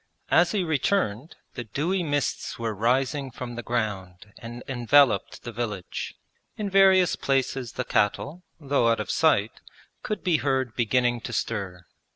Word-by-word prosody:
As 170 0 +5
he 200 -3 0
returned, 155 - 0 0.2
the 120 - -5
dewy 155 - -1
mists 145 -5 -2
were 115 -1 -2
rising 130 +6 0
from 120 0 -7
the 120 - -5
ground 105 -5 -4
and 120 +1 -8
enveloped 130 -3 +3
the 120 - -6
village. 110 -5 -5 0.4
In 205 -2 -3
various 190 -2 +5
places 135 -3 -1
the - - -3
cattle, 140 - 0 0.2
though 140 -5 +1
out 115 - +2
of 105 - -3
sight, - - +2 0.4
could 215 - -4
be 175 -4 +3
heard 130 -5 -1
beginning 120 +1 +1
to 115 - -6
stir. 90 -5 -3
125 Hz, 150 wpm, -26 LUFS, 110-145 Hz, 0.4 s, As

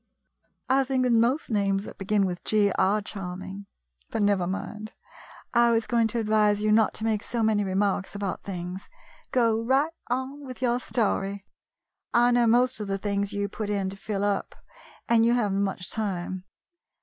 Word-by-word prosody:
" - - -54 0.2
I 270 +1 +3
think 260 -1 0
that 250 - +2
most 235 +5 +2
names 195 -2 +1
that - - -10
begin 200 +1 +1
with 180 -1 -4
G 210 -2 +3
are 200 +3 +2
charming. 195 0 -6 0.4
But 220 - -1
never 200 -3 +2
mind, 210 +3 -5 0.6
I 235 0 +5
was 230 -1 +2
going 235 -2 +2
to 230 +2 -2
advise 210 -1 +2
you 215 - +2
not 220 0 +3
to - - -5
make 220 -2 +1
so 230 0 -2
many 215 -1 +2
remarks 195 0 0
about 200 -2 -3
things. 180 0 -6 0.4
Go 230 -3 +2
right 275 +7 +2
on 260 +3 -3
with 255 -2 -8
your 245 -1 +1
story. 200 -5 -1 0.7
I 240 +1 +5
know 240 -1 +4
most 250 +2 +3
of 210 - -4
the 195 0 -1
things 200 0 -1
you 205 0 -1
put 210 +1 -5
in 195 -2 -1
to - - -7
fill 195 0 -3
up, 205 -1 -1 0.5
and 230 -1 +4
you 235 +1 +4
have 225 -5 +1
n't 195 - +1
much 190 -2 -2
time. 185 -3 -3
210 Hz, 185 wpm, -26 LUFS, 195-235 Hz, 0.7 s, I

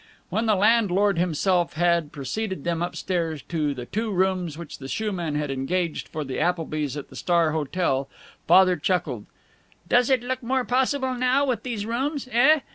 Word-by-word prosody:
When 225 +1 0
the 215 - +4
landlord 205 -2 +3
himself 175 +1 +1
had 170 -2 +1
preceded 190 +4 -4
them 170 -1 -1
up 175 +1 -2
stairs 165 -5 -2
to 150 -4 -1
the 125 -2 -6
two 220 - -2
rooms 185 -4 0
which 170 -3 -8
the 135 - -7
shoeman 175 -4 -2
had 150 -1 -1
engaged 160 +5 -2
for 155 - -4
the 135 -2 -4
Applebys 155 -5 -1
at 145 - -7
the - - -13
Star 170 -3 +2
Hotel, 150 -3 -1 0.4
Father 185 -1 +6
chuckled: 145 - -1 0.6
"Does 245 +6 +3
it 260 -3 +3
look 255 +1 -3
more 260 +2 0
possible, 260 +1 +1
now, 255 +3 +2
with 255 -4 -1
these 230 -5 -4
rooms, 265 +5 -2
eh? 270 +6 +5
180 Hz, 175 wpm, -25 LUFS, 155-230 Hz, 0.6 s, Father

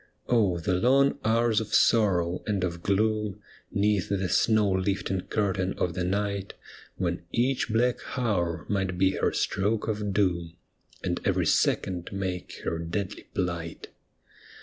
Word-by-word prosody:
Oh, 105 -7 +3
the 85 +2 -1
long 135 +9 +3
hours 115 0 +2
of 110 - -2
sorrow 90 -6 +3
and 100 -3 0
of 85 -2 -2
gloom 105 +1 0 0.3
'Neath 100 -2 +1
the 95 -2 0
snow 110 -3 +3
lifting 95 0 0
curtain 95 -3 0
of 90 - 0
the 90 - -2
night. 100 +1 -2 0.4
When 90 -1 -2
each 125 +2 +1
black 120 +3 +2 0.2
hour 90 -9 0
might 95 -3 -1
be 95 +1 +4
her - - 0
stroke 105 +3 0
of 105 -2 -1
doom. 85 -4 0 0.5
And - - -1
every - - +1
second 90 -2 +1
make 95 -2 -4
her 80 - -2
deadly 90 +4 -4
phght 85 -3 -3
100 Hz, 140 wpm, -27 LUFS, 90-105 Hz, 0.5 s, be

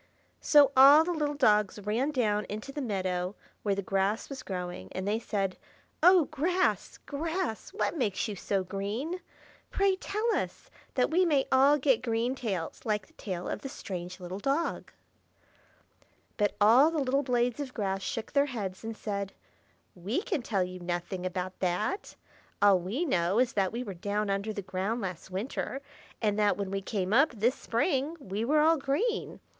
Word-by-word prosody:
So 290 -3 +6
all 280 +4 +9
the 355 - -2
little 295 -2 -1
dogs 210 -8 +3
ran 215 +7 -1
down 215 -7 0
into 215 +6 -5
the 290 - -4
meadow 185 -4 -2 0.3
where 200 -2 0
the 200 - -3
grass 195 +3 0
was 270 -2 -6
growing, 180 - -5
and 190 +1 -3
they 215 +2 +1
said, 195 -5 -2 0.4
"Oh, 360 -1 +7
grass, 350 +5 0
grass! 320 - -3
what 405 - -1
makes 235 - 0
you 210 - -4
so 195 0 -1
green? 210 - -3 0.5
Pray 395 -1 +2
tell 425 +4 -1
us, - - -4 0.2
that 255 +2 +2
we 360 +3 +4
may 295 -6 +2
all 275 +3 +6
get 260 -4 +2
green 235 +1 0
tails, 200 -11 -4
like 210 -3 -1
the - - -26
tail 180 -4 -5
of - - -3
the 270 - -6
strange 180 -6 -6
little 180 +2 -6
dog." 280 +9 -1 1.4
But 205 -1 +1
all 235 +9 +7
the 325 - -3
little 275 -1 +1
blades 245 -1 0
of 280 -3 -4
grass 195 -3 -1
shook 225 +3 -4
their 280 0 +4
heads, 205 -8 -5
and 225 0 -5
said, 200 -2 -4 0.6
"We 205 - -2
can 360 - -1
tell 205 -5 0
you 185 0 -6
nothing 175 +1 -3
about 185 0 -4
that. 185 - -1 0.4
All 200 -2 +6
we 210 - -2
know 185 - +1
is 250 0 +2
that 195 -2 +1
we 240 +2 -3
were 200 -5 -6
down 205 +3 -2
under 200 +2 -1
the 205 -2 -5
ground 190 +5 -2
last 185 -2 -5
winter, 215 +7 -3 0.4
and 210 -1 +1
that 205 -3 +3
when 200 -2 -3
we 195 0 -2
came 195 -1 -2
up 275 +4 +5
this 230 +4 +2
spring, 275 +5 -1
we 205 -4 -4
were 300 +5 +3
all 320 +1 +5
green. 345 - -1
220 Hz, 180 wpm, -29 LUFS, 195-280 Hz, 1.4 s, all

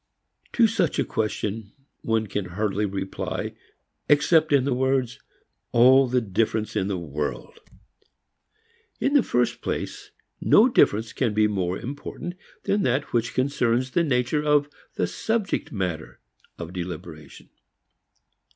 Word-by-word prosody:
To 235 - +5
such 205 -8 +1
a - - +2
question 110 -1 -3 0.3
one 110 -1 0
can 100 -1 -3
hardly 105 +3 -1
reply 95 0 -4 0.6
except 155 +2 +4
in 140 -3 +4
the 135 -1 0
words 130 -1 0 0.5
"All 130 +3 +6
the 125 +1 +2
difference 110 +1 -1
in 95 - 0
the 100 -2 -1
world." 75 - -5 1.4
In 275 - +1
the 285 - +6
first 125 - 0
place, - - -4 0.3
no 225 - +6
difference 110 - +2
can 115 -6 -1
be 110 0 +4
more 95 -3 -1
important 145 +6 -6 0.3
than 205 +1 +1
that 130 -2 0
which 115 -1 0
concerns 130 -2 +1
the 170 - +2
nature 130 0 +1
of 145 -1 +3 0.3
the - - +1
subject 200 - -2
matter 90 -7 -4 0.4
of 85 +1 -7
deliberation. 85 -4 -8
115 Hz, 130 wpm, -25 LUFS, 100-145 Hz, 1.4 s, All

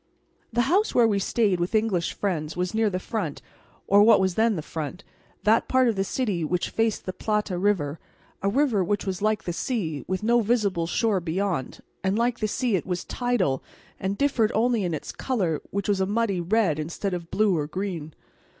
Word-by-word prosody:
The 235 +1 +2
house 370 - +2
where 240 -2 +6
we 205 -2 +1
stayed 200 -2 +1
with 175 +5 -1
English 210 -6 +1
friends 170 -5 -2
was 180 0 -1
near 220 -1 +2
the 185 - -2
front, 185 -5 -3 0.5
or 200 +1 +5
what 225 +2 +7
was 190 -1 +1
then 220 +2 +2
the 160 - -4
front, 160 +5 -5 0.4
that 220 +2 +3
part 260 -1 +3
of 230 - +1
the 195 - +1
city 200 -5 -1
which 175 +3 -1
faced 225 -1 0
the 185 - -3
Plata 210 -3 -1
river, 175 -6 0 0.4
a 195 - +1
river 240 -4 +2
which 205 +4 -1
was 190 -1 -3
like 215 0 +1
the 175 - -3
sea, 165 - -2
with 185 +2 -2
no 240 +2 +4
visible 205 -7 +1
shore 215 +2 +1
beyond; 175 -3 -2 0.2
and 190 +2 +1
like 240 +1 +1
the 215 - 0
sea 235 0 0
it 185 - -2
was 180 -1 -2
tidal, 230 - 0 0.4
and 195 +1 -2
differed 255 -6 +2
only 230 -1 +2
in 175 -3 -1
its - - -6
colour, 185 - -1
which 200 0 -3
was 200 -2 +1
a 190 - +1
muddy 205 -3 0
red 180 -4 +1
instead 170 +5 -3
of 170 -2 -5
blue 210 -3 +2
or 150 -2 -1
green. 170 -3 -4
200 Hz, 205 wpm, -25 LUFS, 175-225 Hz, 0.5 s, what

